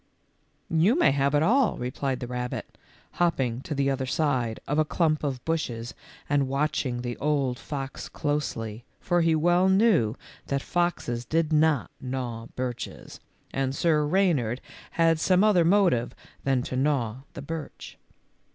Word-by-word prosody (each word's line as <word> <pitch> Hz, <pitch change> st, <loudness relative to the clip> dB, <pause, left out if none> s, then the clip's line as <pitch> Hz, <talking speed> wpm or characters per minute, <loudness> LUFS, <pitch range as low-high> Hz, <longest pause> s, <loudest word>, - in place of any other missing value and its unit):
" -, -, -43 dB, 0.2 s
You 240 Hz, +8 st, +4 dB
may 345 Hz, -, +5 dB
have 140 Hz, +1 st, +1 dB
it 145 Hz, -, +3 dB
all," 245 Hz, +6 st, +3 dB
replied 130 Hz, +1 st, -3 dB
the 125 Hz, -, -4 dB
rabbit, 125 Hz, 0 st, -5 dB, 0.5 s
hopping 130 Hz, -8 st, +1 dB
to 150 Hz, -, -5 dB
the 140 Hz, 0 st, +1 dB
other 130 Hz, -1 st, -2 dB
side 130 Hz, -7 st, 0 dB
of 145 Hz, +2 st, +1 dB
a -, -, +5 dB
clump 155 Hz, -1 st, 0 dB
of 130 Hz, -4 st, -3 dB
bushes 120 Hz, -8 st, -2 dB, 0.3 s
and 140 Hz, -1 st, +2 dB
watching 135 Hz, -3 st, -1 dB
the 120 Hz, -1 st, -3 dB
old 140 Hz, -4 st, 0 dB
fox 135 Hz, -2 st, -6 dB
closely, 120 Hz, -7 st, -3 dB, 0.2 s
for 175 Hz, -1 st, +1 dB
he 165 Hz, -1 st, +3 dB
well 175 Hz, +4 st, +3 dB
knew 190 Hz, -, +3 dB, 0.3 s
that 140 Hz, 0 st, -1 dB
foxes 175 Hz, -9 st, -1 dB
did 160 Hz, +3 st, 0 dB
not 155 Hz, -2 st, +2 dB
gnaw 125 Hz, -3 st, -4 dB
birches, 125 Hz, -1 st, -5 dB, 0.3 s
and 135 Hz, 0 st, -1 dB
Sir 155 Hz, 0 st, +2 dB
Reynard 150 Hz, -, +1 dB, 0.3 s
had 165 Hz, -1 st, +3 dB
some 185 Hz, +3 st, +3 dB
other 205 Hz, -5 st, +5 dB
motive 170 Hz, -, +3 dB, 0.3 s
than 135 Hz, -2 st, +2 dB
to 130 Hz, -, -5 dB
gnaw 130 Hz, -4 st, 0 dB, 0.2 s
the 140 Hz, -, -7 dB
birch. 160 Hz, 0 st, -7 dB
140 Hz, 150 wpm, -26 LUFS, 125-165 Hz, 0.5 s, may